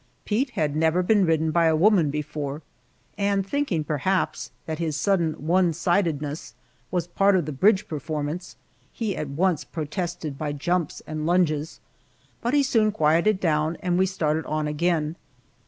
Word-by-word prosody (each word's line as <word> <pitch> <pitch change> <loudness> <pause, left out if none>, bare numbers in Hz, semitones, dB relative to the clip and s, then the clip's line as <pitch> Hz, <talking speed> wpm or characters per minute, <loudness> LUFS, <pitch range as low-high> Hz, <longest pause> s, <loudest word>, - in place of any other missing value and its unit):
Pete 245 +6 0
had 150 -2 0
never 160 +3 +2
been 205 +1 +3
ridden 160 -1 +2
by 170 +1 +3
a 160 -1 +4
woman 175 -2 +4
before, 150 0 -4 0.6
and 200 -1 +1
thinking, 210 - -1
perhaps, 155 +6 -1 0.2
that 160 0 -4
his 160 -3 -1
sudden 170 -4 +1
one 170 +3 +2
sidedness 155 -6 -1 0.3
was 175 -2 -1
a - - -27
part 195 +2 +3
of 175 -5 +1
the 155 - -4
bridge 190 +8 +3
performance, 155 +3 -4 0.6
at 150 - -4
once 170 +4 +1
protested 160 -2 -4
by 150 -1 -2
jumps 170 +2 -1
and 155 0 -4
lunges, 165 -4 +1 0.6
but 240 +5 0
he 285 - +4
soon 225 -5 +2
quieted 170 +3 +2
down 155 -1 +1
and 180 -1 0
we 190 - +3
started 160 -4 -1
on 155 0 -1
again. 160 +1 0
165 Hz, 155 wpm, -25 LUFS, 150-185 Hz, 0.6 s, a